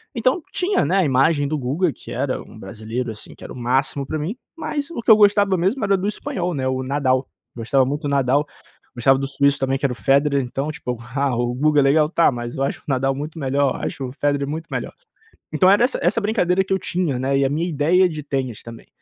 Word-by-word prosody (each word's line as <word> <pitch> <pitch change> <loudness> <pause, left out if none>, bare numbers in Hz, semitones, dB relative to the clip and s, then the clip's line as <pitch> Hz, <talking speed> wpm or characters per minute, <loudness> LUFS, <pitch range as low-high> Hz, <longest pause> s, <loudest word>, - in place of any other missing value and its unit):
Então, 255 +8 +1
tinha, 370 +3 +1
né, 185 +6 +1
a 190 - +4
imagem 145 +2 +2
do 155 +1 -1
Guga 145 +6 0
que - - -12
era - - -2
um - - -14
brasileiro, 110 +4 -5
assim, 110 - -10
que - - -15
era - - -8
o - - -10
máximo 135 +3 0
pra 155 - -3
mim, 170 +10 -3 0.2
mas 290 -2 -3
o 280 - -5
que 230 - +4
eu - - +10
gostava 205 -2 +4
mesmo 195 +9 0
era 200 0 +3
do 190 +2 -2
espanhol, 180 -4 -3
né, 130 -2 -1
o 130 0 -1
Nadal, 130 -1 0 0.3
gostava 125 +3 +1
muito 145 +4 -3
do - - -1
Nadal, 140 +1 +2 0.5
gostava 135 +3 +3
do 135 - -2
suíço 140 +1 +1
também 135 0 0
que 140 - -2
era 130 - +1
o - - -9
Federer. 140 +2 +2
Então, 135 +4 -3
tipo, 125 -5 -5 0.2
ah, 140 -3 +1
o 120 0 -1
Guga 150 +3 +2
é - - +3
legal, 150 +2 +3
tá, 170 -2 +3
mas 120 -1 -6
eu 135 - 0
acho - - -2
o - - -34
Nadal 135 -1 +1
muito 150 +4 -6
melhor, 140 -1 +1
eu - - -7
acho 135 - -4
o - - -9
Federer 140 -1 0
muito 160 +3 -5
melhor. - - -4 0.6
Então 185 - +4
era 205 +5 +5
essa 255 - -2
essa 185 +7 +2
brincadeira 190 -3 +1
que 190 - -1
eu 190 - +1
tinha, 175 -9 -1
né, 135 +1 +1
e 135 - +2
a - - +1
minha 160 +5 -1
ideia 170 +5 +3
de 155 -2 -6
tênis 130 -5 -3
também. 115 -1 -11
140 Hz, 250 wpm, -21 LUFS, 130-175 Hz, 0.6 s, eu